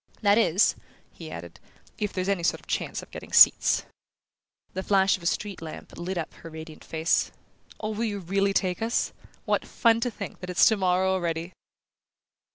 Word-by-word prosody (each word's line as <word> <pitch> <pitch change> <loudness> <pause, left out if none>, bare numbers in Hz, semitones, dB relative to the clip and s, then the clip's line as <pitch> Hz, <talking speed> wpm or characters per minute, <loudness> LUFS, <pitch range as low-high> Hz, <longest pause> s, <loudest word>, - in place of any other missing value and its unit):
That 205 +1 +5
is," 185 -1 +4 0.4
he - - -10
added, - - -9 0.4
"if 210 -2 -1
there's 185 0 -3
any 200 -3 +1
sort 170 - +1
of - - -21
chance - - -3
of - - -16
getting - - -9
seats." - - +6 0.9
The 190 - -3
flash 195 0 +3
of 185 - -10
a 170 - -2
street 200 0 -2
lamp 160 -1 -9
lit 180 +2 -4
up 165 - -4
her 165 - -11
radiant 160 0 -10
face. 160 +1 +1 0.5
"Oh, 215 0 -3
will 220 +2 -2
you 205 -2 -2
really 195 +2 0
take 185 -1 0
us? 230 +2 0 0.3
What - - +1
fun 230 -1 +2
to 245 - 0
think 205 -4 -8
that 180 - -7
it's 180 - +5
tomorrow 190 -3 +3
already!" 170 -1 -2
190 Hz, 180 wpm, -26 LUFS, 175-205 Hz, 0.9 s, seats